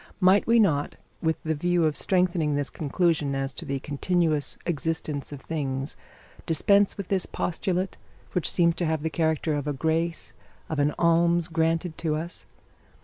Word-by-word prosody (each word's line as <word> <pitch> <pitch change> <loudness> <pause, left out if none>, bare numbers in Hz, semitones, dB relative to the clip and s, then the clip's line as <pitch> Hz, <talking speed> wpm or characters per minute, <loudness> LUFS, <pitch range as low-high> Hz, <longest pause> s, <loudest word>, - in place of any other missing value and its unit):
Might 190 +1 +5
we 230 +1 +5
not, 160 -10 +2 0.3
with 160 0 +1
the 160 - 0
view 175 +3 +1
of 155 -1 +1
strengthening 175 -5 +1
this 145 -1 -2
conclusion 155 -2 0
as 135 0 -2
to - - -6
the 140 0 -2
continuous 155 +1 0
existence 155 -3 -2
of 145 -2 -8
things, 135 -3 -3 0.5
dispense 200 +5 +3
with 200 -3 -6
this 190 -2 0
postulate, 185 +2 -2 0.3
which 180 - 0
seems 170 -2 +3
to 175 - 0
have 155 -1 -1
the 160 - -1
character 160 0 0
of 145 0 -2
a 145 - 0
grace, 160 +4 -1 0.4
of 155 - -2
an 145 +1 +3
alms 170 0 +3
granted 165 0 0
to 160 -2 0
us? 165 +3 -6
160 Hz, 165 wpm, -26 LUFS, 150-175 Hz, 0.5 s, Might